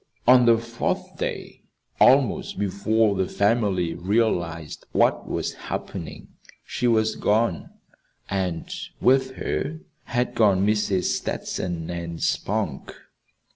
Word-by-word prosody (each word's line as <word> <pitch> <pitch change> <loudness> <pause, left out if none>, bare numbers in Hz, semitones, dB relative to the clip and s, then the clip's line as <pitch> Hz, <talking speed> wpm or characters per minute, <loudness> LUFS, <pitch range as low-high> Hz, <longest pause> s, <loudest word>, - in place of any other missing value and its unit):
On 125 -1 +7
the 115 -1 +6
fourth 115 0 -3
day, - - -4 0.4
almost 130 -3 +4
before 105 +2 +1
the 95 -1 0
family 100 -5 +1
realized 85 -5 -1
what - - +2
was - - -2 0.2
happening, - - -6 0.4
she 125 - -1
was 110 -1 +2
gone; 105 -4 +1 0.6
and 95 -4 -2 0.3
with 130 0 +3
her 160 +3 -3 0.3
had 125 0 -1
gone 100 -3 +3
Mrs. 105 -3 +1
Stetson 85 -3 -3
and 85 -1 -5
Spunk. - - -2
105 Hz, 105 wpm, -24 LUFS, 90-115 Hz, 0.6 s, On